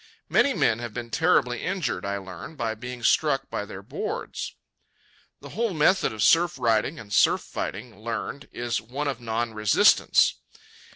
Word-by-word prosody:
Many 280 - +3
men 115 0 +2
have 120 -3 -6
been 120 -1 -6
terribly 130 -8 +2
injured, 170 - -2
I 100 0 -1
learn, 95 - -9
by 115 -5 -2
being 125 +2 -8
struck 135 0 +2
by 105 - -3
their 100 -2 -9
boards. - - -5 0.9
The - - -10
whole 225 -3 -2
method 170 +5 +3
of 110 -2 -2
surf 165 -2 +4
riding 120 +5 +1
and 105 -2 -9
surf - - +4
fighting, 110 +2 -6
learned, 115 +5 -5
is 120 0 -2
one 135 +7 -4
of 130 -3 -3
non 115 0 -2
resistance. 105 -2 +4
120 Hz, 160 wpm, -25 LUFS, 110-145 Hz, 0.9 s, surf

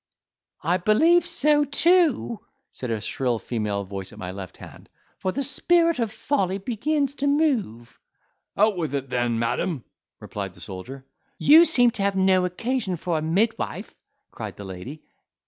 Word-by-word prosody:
"I 170 +4 +2
believe 315 - +4
so 295 +1 +3
too," 300 - +2 0.3
said 125 - -6
a 115 -1 -1
shrill 125 +2 -1
female 105 -3 -3
voice 95 -1 -7
at - - -14
my 90 - -6
left 95 -1 -9
hand, - - -13 0.3
"for 185 - -1
the 275 +8 -2
spirit 335 +2 +2
of 225 -3 -1
folly 195 -5 -1
begins 270 +7 -1
to 285 0 -2
move." 255 - 0 0.6
"Out 210 -1 +3
with 160 -4 -2
it 135 -2 -4
then, 120 -2 0
madam!" 120 +5 -1 0.4
replied 100 -3 -6
the - - -16
soldier. 110 +9 -8 0.3
"You 320 +4 +7
seem 245 -7 +5
to 220 - -5
have 200 0 +1
no 190 -1 +3
occasion 215 +2 -2
for 165 -1 -2
a - - -5
midwife," 195 +9 -1 0.4
cried - - -7
the 100 - -8
lady. 95 +11 -8
185 Hz, 160 wpm, -24 LUFS, -, 0.6 s, You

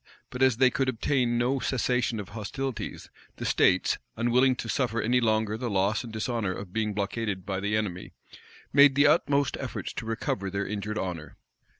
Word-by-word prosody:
But 125 - -6
as 130 -4 +4
they 130 -1 +5
could 130 +1 0
obtain 125 0 0
no 125 +3 +1
cessation 125 -3 0
of 100 - -7
hostilities, 115 +5 -5 0.2
the - - -6
states, - - +3 0.2
unwilling 125 +3 +3
to 120 - -6
suffer 115 -1 0
any 125 +3 +2
longer 110 -1 +1
the 120 -1 -2
loss 100 +4 +1
and 120 - -8
dishonor 110 -2 -2
of 95 -1 -8
being 105 -2 -1
blockaded 100 -1 -2
by 95 -1 -2
the 105 +2 0
enemy, 95 -4 -4 0.6
made 140 -1 +7
the 145 +1 +5
utmost 145 -2 +3
efforts - - -5
to 115 - -6
recover 105 -3 -2
their 100 +1 -2
injured 105 +1 -4
honor. 90 -6 -5
115 Hz, 180 wpm, -27 LUFS, 105-125 Hz, 0.6 s, made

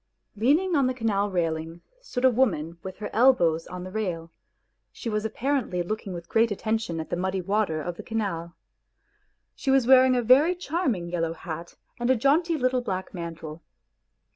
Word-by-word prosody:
Leaning 305 - +2
on 275 -3 +3
the 255 - -1
canal 205 -4 0
railing 165 -2 -2 0.2
stood 260 - -2
a - - +8
woman 170 -10 0
with 190 0 -8
her 210 - -6
elbows 175 -10 +3
on 180 0 -7
the 185 - -8
rail, 175 -6 -3 0.6
she 230 - -6
was 210 0 -1
apparently 235 -6 -1
looking 210 +2 -4
with 170 -1 -7
great 225 +1 +3
attention 215 -4 -2
at 160 - -6
the - - +1
muddy 190 +2 -1
water 195 -3 0
of 170 +2 -5
the - - -6
canal. 175 -7 -3 1.0
She 275 - -4
was 265 -2 +4
wearing 260 0 +6
a 245 - +1
very 280 +10 +5
charming 285 - -2
yellow 165 -2 -1
hat 170 0 -7 0.2
and 240 +1 0
a 260 - +5
jaunty 310 +7 +2
little 255 -2 +1
black 190 -5 -4
mantle. 165 -2 -7
210 Hz, 175 wpm, -26 LUFS, 170-255 Hz, 1.0 s, a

